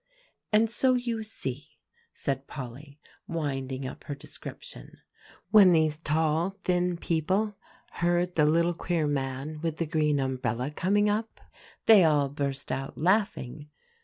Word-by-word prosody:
"And 220 Hz, +1 st, +4 dB
so 255 Hz, +3 st, +2 dB
you 240 Hz, -2 st, -2 dB
see," 150 Hz, -, -6 dB, 0.3 s
said 135 Hz, 0 st, -3 dB
Polly, 140 Hz, +3 st, -9 dB, 0.3 s
winding 135 Hz, -5 st, -3 dB
up 130 Hz, -, -8 dB
her 145 Hz, -, -4 dB
description, -, -, -10 dB, 0.5 s
"when 200 Hz, -4 st, +8 dB
these 155 Hz, -2 st, +2 dB
tall, 160 Hz, +4 st, 0 dB
thin 180 Hz, -1 st, +1 dB
people 185 Hz, +6 st, 0 dB, 0.4 s
heard 175 Hz, +1 st, 0 dB
the 150 Hz, -3 st, +3 dB
little 170 Hz, +3 st, +3 dB
queer 170 Hz, -1 st, -1 dB
man 140 Hz, +1 st, -3 dB
with 165 Hz, -2 st, -2 dB
the 165 Hz, -, -1 dB
green 150 Hz, -2 st, +1 dB
umbrella 130 Hz, 0 st, -2 dB
coming 205 Hz, +7 st, +2 dB
up, 215 Hz, +2 st, -2 dB, 0.5 s
they 215 Hz, -4 st, +8 dB
all 145 Hz, -3 st, +3 dB
burst 140 Hz, -2 st, -4 dB
out 135 Hz, +1 st, -4 dB
laughing. 155 Hz, -, 0 dB
155 Hz, 135 wpm, -28 LUFS, 140-180 Hz, 0.5 s, when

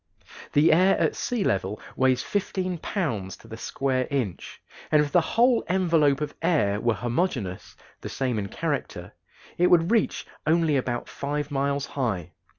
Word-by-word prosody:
The 150 Hz, +3 st, +5 dB
air 185 Hz, +4 st, +4 dB
at -, -, +1 dB
sea 240 Hz, -5 st, -1 dB
level 95 Hz, -, -1 dB, 0.2 s
weighs 130 Hz, -1 st, +2 dB
fifteen 185 Hz, -3 st, -2 dB
pounds 115 Hz, -, -3 dB
to -, -, -17 dB
the 110 Hz, -, -8 dB
square 130 Hz, +2 st, -1 dB
inch, 125 Hz, -11 st, -3 dB, 0.3 s
and 155 Hz, -, +5 dB
if 145 Hz, -, -4 dB
the 175 Hz, -, +5 dB
whole 235 Hz, +8 st, +3 dB
envelope 165 Hz, -6 st, +2 dB
of 150 Hz, -1 st, -3 dB
air 125 Hz, -, +1 dB
were 120 Hz, -2 st, +1 dB
homogeneous 120 Hz, -, -2 dB, 0.2 s
the -, -, -7 dB
same 125 Hz, -5 st, -1 dB
in 100 Hz, -, -3 dB
character -, -, -4 dB, 0.5 s
it 180 Hz, -, +5 dB
would 170 Hz, +1 st, +4 dB
reach 230 Hz, -3 st, +1 dB, 0.2 s
only 160 Hz, -1 st, +3 dB
about 125 Hz, -2 st, -2 dB
five 145 Hz, +1 st, -4 dB
miles 140 Hz, 0 st, 0 dB
high. 115 Hz, -, -3 dB
140 Hz, 155 wpm, -25 LUFS, 120-170 Hz, 0.5 s, The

